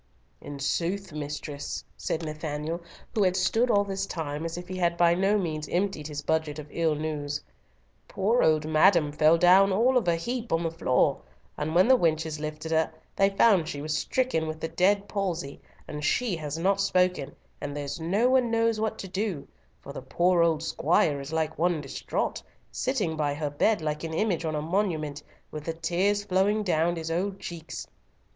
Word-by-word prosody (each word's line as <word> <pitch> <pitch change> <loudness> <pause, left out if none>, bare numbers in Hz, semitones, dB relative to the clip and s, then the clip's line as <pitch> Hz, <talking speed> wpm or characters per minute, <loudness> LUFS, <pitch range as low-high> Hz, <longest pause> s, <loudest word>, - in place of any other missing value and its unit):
"In 145 - -7
sooth, 175 +6 -2
mistress," 145 -1 -5
said 165 0 -3
Nathanael, 155 +2 -4 0.3
who 215 - +1
had 185 -2 +3
stood 230 +6 +2
all 205 -3 +4
this 195 -1 -3
time 155 -2 -4
as 165 +1 -4
if 175 0 -7
he 185 0 -5
had 170 -1 +1
by 170 -1 +5
no 195 +4 +2
means 155 -5 -3
emptied 180 -4 -1
his 150 -1 -5
budget 160 -1 0
of 150 - -6
ill 165 -2 +1
news, 150 -1 -3 0.6
"poor 220 +5 +1
old 155 -1 +3
madam 155 -1 +4
fell 155 +2 +4
down 185 +3 +6
all 240 +7 +3
of 230 - 0
a 170 - +3
heap 235 +7 -4
on 165 +1 +1
the 165 - -1
floor, 145 -6 +1 0.3
and 155 +2 -3
when 185 +5 +6
the 260 - +7
wenches 160 -6 0
lifted 155 +1 -5
her, 160 0 +2 0.2
they 195 0 +4
found 195 -4 +4
she 145 - -5
was 150 +1 -2
stricken 250 -6 0
with 155 0 -5
the 160 - -2
dead 200 +4 +2
palsy, 175 -8 -3 0.3
and 150 -1 -6
she 215 +6 +1
has 155 -2 -4
not 195 +4 +2
spoken, 180 -6 +1 0.3
and 145 0 -4
there's 145 +2 -4
no 195 +9 +2
one 255 -2 +3
knows 230 -1 +1
what 220 0 -1
to 195 - -6
do, 190 -5 -3 0.4
for 140 - -8
the 140 - -6
poor 175 +6 +2
old 165 -2 +2
squire 145 -3 +1
is 140 +2 -8
like 160 -1 -2
one 175 -1 +2
distraught, 140 -2 -3 0.3
sitting 215 -11 -1
by 145 -2 -1
her 150 -1 -3
bed 190 +7 +2
like 150 0 -2
an 160 -1 -4
image 185 -4 0
on 155 -1 -1
a 150 - -2
monument, 160 -5 -1 0.3
with 155 -1 -6
the 165 - -2
tears 180 +5 0
flowing 205 +2 +1
down 170 -2 +1
his 165 -1 -4
old 190 +3 -1
cheeks. 170 -2 -7
165 Hz, 195 wpm, -27 LUFS, 155-195 Hz, 0.6 s, the